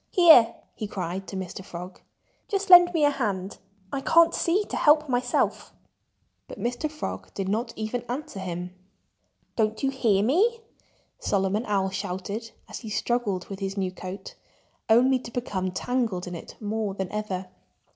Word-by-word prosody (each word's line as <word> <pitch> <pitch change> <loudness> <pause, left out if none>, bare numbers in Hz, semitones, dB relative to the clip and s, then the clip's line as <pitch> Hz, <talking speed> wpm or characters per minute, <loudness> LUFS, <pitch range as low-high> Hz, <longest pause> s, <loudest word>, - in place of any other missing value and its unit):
"Here!" 315 - +7 0.2
he 215 - -5
cried 190 0 -4
to - - -7
Mr. 190 0 -5
Frog. 180 +1 -9 0.5
"Just 395 -1 -1
lend 355 0 +10
me 320 -4 +3
a 290 - +4
hand! 200 -7 -3 0.3
I 275 - -1
can't 335 +3 +5
see 365 +5 +1
to - - -6
help 300 0 +4
myself." 250 -1 0 0.7
But - - -9
Mr. 245 +6 -2
Frog 305 0 -6
did 195 -1 -2
not 225 +4 -1
even 220 +3 -3
answer 250 -5 -5
him. 180 -1 -5 0.8
"Don't 220 0 0
you 270 - +2
hear 220 -7 +2
me?" 420 - +2 0.6
Solomon 200 +3 0
Owl 195 -2 +1
shouted, 200 +3 -4 0.2
as - - -7
he 225 - -8
struggled 205 -3 -1
with 195 -1 -7
his 195 0 -4
new 190 -2 -1
coat, 185 +1 -8 0.6
only 255 +4 +5
to 240 - -9
become 205 -6 -2
tangled 215 -1 -1
in 180 - -6
it 170 - -9
more 210 -2 -2
than 190 -2 -4
ever. 195 -3 -4
215 Hz, 160 wpm, -26 LUFS, 190-255 Hz, 0.8 s, lend